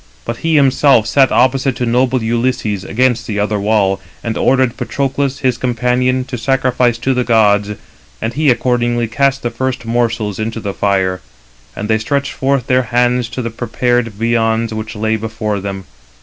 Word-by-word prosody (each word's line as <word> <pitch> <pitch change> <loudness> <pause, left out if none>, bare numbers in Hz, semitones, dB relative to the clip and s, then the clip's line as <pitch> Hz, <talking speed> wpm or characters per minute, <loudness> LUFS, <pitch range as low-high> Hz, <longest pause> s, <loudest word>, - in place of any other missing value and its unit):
But 115 - -4
he 165 +3 0
himself 135 -4 +4
sat 135 +3 +3
opposite 130 +1 +2
to 125 - -2
noble 125 +1 +1
Ulysses, 115 -4 -1
against 120 +1 0
the 105 - -3
other 105 0 0
wall, 100 -2 +1 0.2
and 115 -1 -3
ordered 130 -2 +2
Patroclus, 140 0 -2
his 130 -3 0
companion, 125 +1 0
to 125 -2 -6
sacrifice 125 -2 +1
to 130 +3 0
the 125 0 0
gods; 105 -3 +2 0.5
and 115 - -3
he 150 +2 +2
accordingly 120 -1 +1
cast 135 +3 0
the 120 - -1
first 130 -2 -3
morsels 115 -3 -1
300 110 - -2
into 115 0 -5
the 100 -2 -4
fire. 95 -2 0 0.5
And 105 - -4
they 110 0 +2
stretched 140 +5 -1
forth 135 -2 0
their 130 0 +2
hands 120 0 +1
to 125 - -5
the 115 - -3
prepared 120 +1 0
viands 115 +1 0
which 110 +1 -5
lay 110 +1 0
before 110 -1 -3
them. 95 0 -5
120 Hz, 175 wpm, -16 LUFS, 110-130 Hz, 0.5 s, himself